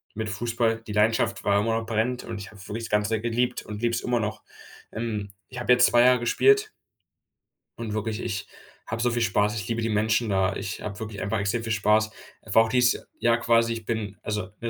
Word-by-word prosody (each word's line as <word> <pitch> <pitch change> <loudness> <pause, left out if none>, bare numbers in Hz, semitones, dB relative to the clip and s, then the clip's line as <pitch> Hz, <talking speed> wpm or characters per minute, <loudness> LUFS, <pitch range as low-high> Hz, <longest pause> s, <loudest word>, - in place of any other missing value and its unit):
mit 110 0 -3
Fußball. 115 +1 -1
Die 105 - -6
Leidenschaft 110 +2 +2
war 100 0 +3
immer 115 +2 +1
noch 115 - -7
brennend 120 +3 -1
und 115 -3 -5
ich 100 0 -9
habe 105 -2 -14
wirklich 115 +2 -5
das - - -8
Ganze 105 +1 +1
geliebt 120 +2 -1
und 105 0 -7
liebe 120 -1 +1
es - - -2
immer 125 -1 0
noch, 110 0 -3 0.5
ähm. 105 -3 -4 0.2
Ich 125 - -6
habe 120 +1 +4
jetzt 125 0 +6
2 120 - +4
Jahre 125 0 +5
gespielt 410 - +3 1.1
und 115 -2 -5
wirklich, 110 0 -2
ich 105 -5 -4 0.4
habe 110 +1 -3
so 120 0 +2
viel 120 0 0
Spaß 105 -1 +2
ich 105 -4 -4
liebe 115 0 -1
die 115 - -1
Menschen 110 +2 +1
da, 95 -1 +1
ich 100 +1 -5
habe 105 -1 -6
wirklich 110 -3 -6
einfach 105 +3 -1
extrem 100 +4 -1
viel 115 - -3
Spaß. 110 0 +3 0.3
Einfach 110 0 +4
auch 110 - -3
dieses 125 0 +2
Jahr 115 0 +3
quasi, 115 0 +3
ich 115 -1 -7
bin 105 -3 -3
also 105 -1 -2 0.2
'ne 115 - -2
110 Hz, 225 wpm, -26 LUFS, 105-120 Hz, 1.1 s, jetzt